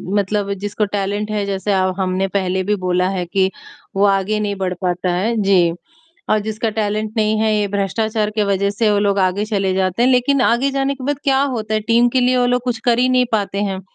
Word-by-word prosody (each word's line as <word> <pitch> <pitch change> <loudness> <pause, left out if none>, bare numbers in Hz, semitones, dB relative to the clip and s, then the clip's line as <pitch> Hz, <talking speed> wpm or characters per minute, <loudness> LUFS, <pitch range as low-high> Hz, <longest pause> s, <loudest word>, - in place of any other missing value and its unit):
मतलब 200 0 0
जिसको 205 +1 -1
टैलेंट 205 +2 -2
है, 205 -1 -1
जैसे 200 +1 -2
ह 185 -1 +1
हमने 190 0 0
पहले 190 -1 -1
भी 210 +2 0
बोला 180 -1 0
है 185 -2 -2
कि 190 +1 +1 0.5
वो 195 - +2
आगे 200 +2 +1
नहीं 205 -1 -2
बढ़ 185 -1 -2
पाता 180 0 -1
है। 220 +6 0
जी 180 -4 +3 0.6
और 215 - +4
जिसका 220 +1 -3
टैलेंट 215 0 -2
नहीं 215 0 +1
है, 220 -1 +2
ये 205 -1 +1
भ्रष्टाचार 210 +2 -1
के 210 -1 0
वजह 200 0 0
से 215 +1 +1
वो 205 - +2
लोग 200 -1 +1
आगे 190 +2 +1
चले 195 -3 -1
जाते 190 +4 0
हैं। 255 - +4
लेकिन 255 +2 +2
आगे 255 +4 +2
जाने 275 0 -1
के 265 -2 -9
बाद 290 0 -1
क्या 270 -1 +3
होता 220 -6 -2
है? 215 - +1
टीम 230 +3 +3
के 255 +1 +1
लिए 250 +1 +2
वो 245 0 +2
लोग 245 0 +1
कुछ 245 -2 -1
कर 240 -1 +3
ही 255 +1 +3
नहीं 255 -1 +3
पाते 200 -1 -1
हैं। 190 -2 -2
210 Hz, 230 wpm, -18 LUFS, 195-230 Hz, 0.6 s, और